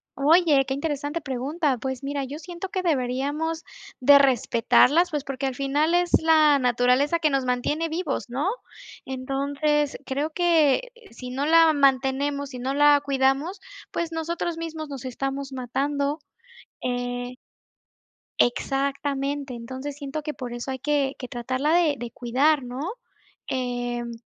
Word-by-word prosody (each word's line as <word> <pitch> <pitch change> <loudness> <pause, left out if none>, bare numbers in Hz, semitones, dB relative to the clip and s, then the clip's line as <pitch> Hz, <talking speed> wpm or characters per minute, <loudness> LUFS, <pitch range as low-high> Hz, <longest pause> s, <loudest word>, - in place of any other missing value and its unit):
Oye, 300 -1 +4
qué 265 - -1
interesante 290 +2 -3
pregunta. 275 +2 -1
Pues, 265 +1 -4
mira, 280 0 -2
yo 275 +3 -6
siento 345 +4 -7
que 375 -1 -3
deberíamos 290 +2 -1 0.4
de 280 +2 +7
respetarlas, 265 +5 +4
pues, 295 -4 -3
porque, 275 -1 -3
al 265 - -3
final, 290 +5 +1
es 355 0 +1
la 310 -3 +5
naturaleza 250 +5 +2
que 315 -2 +2
nos 270 -1 0
mantiene 290 +6 -1
vivos, 335 -4 -3
¿no?, 270 +8 -1 0.6
entonces, 280 +3 -1
creo 285 +4 -2
que 335 - +2 0.2
si 250 +2 -9
no 270 +3 -2
la 325 0 +6
mantenemos, 280 0 +1
si 250 - -7
no 260 +2 -2
la 290 0 +5
cuidamos, 275 +7 +1 0.3
pues, 340 -1 -3
nosotros 330 +1 -3
mismos 320 -2 -5
nos 275 -3 -7
estamos 270 +2 -4
matando. 280 +3 -2 0.6
Eh 245 0 -3 1.0
Exactamente. 275 +2 0
Entonces, 260 +4 -6
siento 290 +1 -5
que 300 - -4
por 245 -4 -7
eso 240 +2 -5
hay 260 - -4
que 285 0 0
que 250 - -6
tratarla 255 +5 -1
de 330 -4 +3
de 240 0 -6
cuidar, 270 +5 +1
¿no? 250 +2 -6 0.7
Em, 245 -2 -3
280 Hz, 140 wpm, -25 LUFS, 260-305 Hz, 1.0 s, de